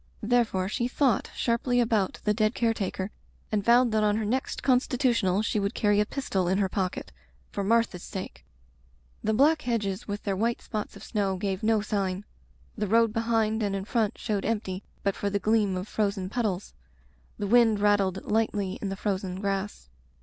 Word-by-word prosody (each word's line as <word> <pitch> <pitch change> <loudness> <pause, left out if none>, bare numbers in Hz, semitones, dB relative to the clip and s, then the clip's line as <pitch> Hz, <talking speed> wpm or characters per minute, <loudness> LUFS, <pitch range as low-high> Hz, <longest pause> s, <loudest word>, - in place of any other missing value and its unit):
Therefore 220 -5 +2
she 235 +4 -1
thought 255 -3 +1
sharply 245 +1 +1
about 220 -5 +1
the 210 - +2
dead 215 +1 +1
care 230 -1 +2
taker 195 -1 -3 0.4
and 210 -2 0
vowed 240 +2 +5
that 215 0 +2
on 210 0 +2
her 220 - -1
next 255 +5 -2
constitutional 245 -6 +2
she 215 - 0
would 200 0 -2
carry 205 -1 +3
a 210 - +2
pistol 195 -10 -1
in 190 +2 +2
her 200 -1 +2
pocket 190 -1 -3 0.2
— 60 0 -34
for 200 - -2
Martha's 225 -3 +2
sake. 190 +1 -7 0.8
The 220 0 +1
black 305 +6 +4
hedges 210 -6 -2
with 205 0 -4
their 200 -2 -1
white 230 +4 0
spots 215 -2 -5
of - - -11
snow 195 -4 -1
gave 190 0 -2
no 220 -1 +2
sign; 200 -2 -2 0.5
the 210 -2 -2
road 225 +1 +3
behind 225 -1 +1
and 200 -2 0
in 195 0 -3
front 225 -1 0
showed 210 -4 -2
empty 200 -4 -2 0.2
but 200 -1 +1
for 205 - -2
the 200 - 0
gleam 205 -1 +2
of 185 +3 -5
frozen 200 -4 -1
puddles. 210 -6 -2 0.6
The 205 - -3
wind 225 0 +4
rattled 200 -2 +2
lightly 210 -3 0
in 200 - -2
the 195 - -3
frozen 190 -2 -2
grass. 195 - -3
210 Hz, 185 wpm, -27 LUFS, 195-230 Hz, 0.8 s, vowed